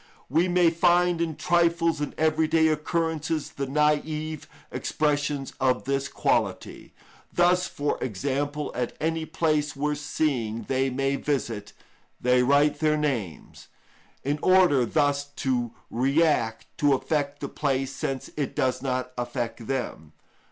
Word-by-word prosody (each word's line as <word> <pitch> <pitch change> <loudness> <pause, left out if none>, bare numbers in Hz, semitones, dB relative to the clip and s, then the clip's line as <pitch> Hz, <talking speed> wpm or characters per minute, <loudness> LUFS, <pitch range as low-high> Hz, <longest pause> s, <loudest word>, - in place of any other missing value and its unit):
We 165 +7 +3
may 175 -2 +4
find 175 0 +3
in 165 -2 -1
trifles 170 -2 +2
and 145 - -3
everyday 160 0 +3
occurrences 160 0 -1
the 140 -1 -4
naïve 150 +2 0 0.3
expressions 145 -2 -1
of 130 -1 +2
this 135 +1 -1
quality. - - -1 0.4
Thus, 180 +1 +3
for 145 0 -2
example, 140 +6 -2
at 125 -1 -3
any 160 0 -1
place 155 -2 0
worth 150 +1 -1
seeing 120 -7 -1
they 135 +3 0
may 135 +1 0
visit, 115 -9 -3 0.5
they 125 0 +3
write 140 +3 +3
their 155 -1 +2
names, 120 - -3 0.6
in 145 +2 -1
order 180 -10 +4
thus 145 +1 +1
to 120 -3 -1 0.2
react, 130 -3 +1
to 145 -2 +4
affect 145 +1 -2
the - - -4
place 135 -2 -1
since 135 -1 -4
it 145 -3 -3
does 130 -1 0
not 130 -1 -2
affect 120 -1 -4
them. 120 - -4
145 Hz, 130 wpm, -26 LUFS, 130-160 Hz, 0.6 s, may